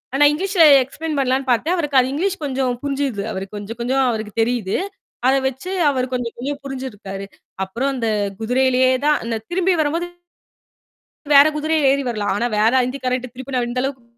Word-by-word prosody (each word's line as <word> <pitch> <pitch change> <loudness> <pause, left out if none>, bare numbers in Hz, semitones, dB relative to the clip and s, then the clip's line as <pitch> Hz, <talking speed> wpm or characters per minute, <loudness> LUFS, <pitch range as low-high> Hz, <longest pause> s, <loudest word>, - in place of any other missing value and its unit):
ஆனா 290 +2 +5
இங்கிலீஷ்ல 370 +2 +2 0.2
எக்ஸ்ப்ளெய்ன் 300 +3 -5
பண்ணலான்னு 265 0 0
பார்த்தேன். 305 +9 +1
அவருக்கு 295 -6 0
அது 255 +1 +1
இங்கிலீஷ் 385 +5 -1
கொஞ்சம் 260 -3 -1
புரிஞ்சுது. 275 -7 -2
அவருக்கு 195 +2 -6
கொஞ்சம், 205 +3 -7
கொஞ்சம் 260 +3 +1
அவருக்குத் 215 -2 -4
தெரியுது. 225 -4 0 0.5
அத 265 - +5
வச்சு 265 +8 -6 0.2
அவரு 255 -3 0
கொஞ்சம், 245 -2 -2
கொஞ்சம் 280 +3 -4
புரிஞ்சுருக்காரு. 210 -8 -6 0.4
அப்புறம் 245 +9 -2
அந்தக் 215 -5 -1
குதிரையிலேயே 255 +2 +2
தான் 300 -1 +4
அந்த 230 -1 -2
திரும்பி 370 +1 +2
வரும்போது 330 +4 -1 1.3
வேற 285 +2 +8
குதிரையில 310 -2 +2
ஏறி 280 0 -1
வரலாம். 210 -3 -2
ஆனா 235 - 0
வேற 220 +3 +3
இந்திக்காரன்ட்ட 255 -1 -3
திருப்பி 260 +1 -6
நான் 245 -1 0
இந்த 250 +1 -1
அளவுக்கு 265 -2 -4
260 Hz, 165 wpm, -20 LUFS, 230-285 Hz, 1.3 s, வேற